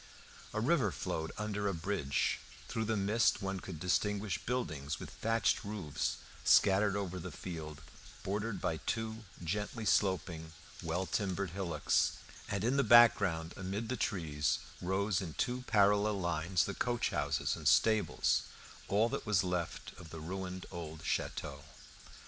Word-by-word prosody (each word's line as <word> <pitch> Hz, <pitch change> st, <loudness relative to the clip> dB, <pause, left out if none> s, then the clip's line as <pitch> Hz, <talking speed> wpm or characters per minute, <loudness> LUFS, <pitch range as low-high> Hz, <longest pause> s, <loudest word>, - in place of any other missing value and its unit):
A -, -, -2 dB
river 125 Hz, -, +2 dB
flowed 80 Hz, +3 st, -3 dB
under 105 Hz, -1 st, -2 dB
a 100 Hz, -, 0 dB
bridge; 80 Hz, -5 st, 0 dB, 0.3 s
through 110 Hz, -1 st, -2 dB
the 110 Hz, 0 st, 0 dB
mist 105 Hz, +3 st, +3 dB
one 95 Hz, 0 st, -2 dB
could 90 Hz, -4 st, -7 dB
distinguish 100 Hz, 0 st, 0 dB
buildings 75 Hz, -, -2 dB
with -, -, -8 dB
thatched 115 Hz, 0 st, +1 dB
roofs 100 Hz, -8 st, -2 dB, 0.3 s
scattered 100 Hz, +1 st, +5 dB
over 95 Hz, -3 st, -3 dB
the -, -, -5 dB
field 80 Hz, -4 st, -7 dB, 0.4 s
bordered 105 Hz, +1 st, -2 dB
by 80 Hz, -2 st, -1 dB
two 110 Hz, +4 st, -3 dB, 0.2 s
gently 105 Hz, +6 st, -2 dB
sloping, 85 Hz, -5 st, +1 dB, 0.3 s
well 85 Hz, +3 st, -1 dB
timbered 95 Hz, -2 st, -1 dB
hillocks, 85 Hz, -5 st, +1 dB, 0.4 s
and 100 Hz, -1 st, -1 dB
in 125 Hz, +5 st, +2 dB
the 140 Hz, -, +4 dB
background 100 Hz, -8 st, +6 dB
amid 100 Hz, +4 st, -4 dB
the 130 Hz, -, 0 dB
trees 80 Hz, -11 st, 0 dB, 0.2 s
rose 95 Hz, +1 st, +1 dB
in 80 Hz, -4 st, -6 dB
two 125 Hz, 0 st, -1 dB
parallel 105 Hz, -1 st, +4 dB
lines 85 Hz, 0 st, +1 dB
the 100 Hz, -, -3 dB
coach 120 Hz, +3 st, 0 dB
houses -, -, 0 dB
and -, -, -3 dB
stables, 110 Hz, -2 st, +3 dB, 0.4 s
all 105 Hz, +3 st, +3 dB
that 115 Hz, -, -4 dB
was 100 Hz, -4 st, +3 dB
left 90 Hz, -2 st, -3 dB
of 85 Hz, -3 st, -11 dB
the 80 Hz, -, -7 dB
ruined 95 Hz, +3 st, -5 dB
old 80 Hz, -3 st, -7 dB
château. -, -, -2 dB
95 Hz, 145 wpm, -34 LUFS, 85-105 Hz, 0.4 s, background